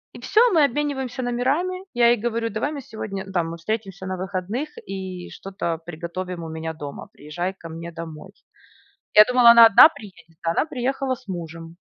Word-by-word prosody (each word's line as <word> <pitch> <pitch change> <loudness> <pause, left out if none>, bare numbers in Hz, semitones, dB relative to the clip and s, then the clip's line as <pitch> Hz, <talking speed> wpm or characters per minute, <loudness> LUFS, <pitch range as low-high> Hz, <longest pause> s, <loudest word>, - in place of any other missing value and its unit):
И - - -9
всё, 415 - +3
мы 320 -3 +5
обмениваемся 265 -2 -1
номерами. 275 +10 -1
Я 240 -1 +4
ей 240 - +4
говорю: 230 +1 -2
"Давай 225 +8 -2
мы 285 -3 -6
сегодня 195 -4 -7
там 170 -3 -1
мы 170 - -7
встретимся 195 +1 -4
на 185 0 -3
выходных 190 +9 -4 0.2
и 190 -2 -6
что-то 190 -4 -4
приготовим 175 +1 -6
у 165 - -7
меня 160 0 -5
дома. 145 -3 -8
Приезжай 175 +6 -5
ко 170 -3 -11
мне 165 +1 -8
домой". 165 +2 -9 0.8
Я 210 - +10
думала, 250 0 +6
она 235 -1 +10
одна 225 +7 +9
приедет, 170 - -15
а 165 - 0
она - - +1
приехала 270 -1 -2
с 255 - -18
мужем. 165 -2 -7
195 Hz, 180 wpm, -23 LUFS, 170-245 Hz, 0.8 s, Я